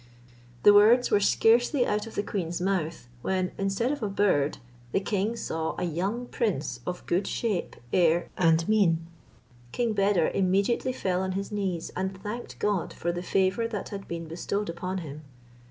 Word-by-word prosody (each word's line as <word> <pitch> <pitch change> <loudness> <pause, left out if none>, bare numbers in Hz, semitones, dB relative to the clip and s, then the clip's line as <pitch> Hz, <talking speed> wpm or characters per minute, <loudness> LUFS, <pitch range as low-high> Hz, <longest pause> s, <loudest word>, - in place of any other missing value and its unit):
The 205 - +8
words 225 +5 +6
were 205 - +5
scarcely 240 +6 +3
out 210 +1 -1
of 225 - -10
the 205 - 0
queen's 175 -5 -3
mouth, 175 -7 -1
when, 185 +2 -1
instead 195 +6 0
of 295 - -3
a 210 - -1
bird, 195 -8 +2 0.4
the - - +3
king 205 +2 -1
saw 160 -7 -3
a - - -2
young 190 +9 -2
prince 155 - -2
of 180 0 -4
good 180 +3 0
shape, 215 -7 -2 0.2
air, 170 -1 +3
and 165 -1 +3
mien. 180 -7 +3 0.7
King 235 -2 0
Beder 200 -4 +2
immediately 195 +7 +1
fell 185 -7 -1
on 190 0 -2
his 195 +2 -4
knees, 190 -5 -2
and 190 +1 -2
thanked 210 +5 -6
God 205 -4 -1
for 175 - -2
the 175 0 -4
favour 190 +5 +1
that 210 -4 -5
had 195 -1 -7
been 170 -1 -5
bestowed 180 +4 -3
upon 180 +3 -3
him. 150 +1 -8
195 Hz, 170 wpm, -27 LUFS, 175-210 Hz, 0.7 s, The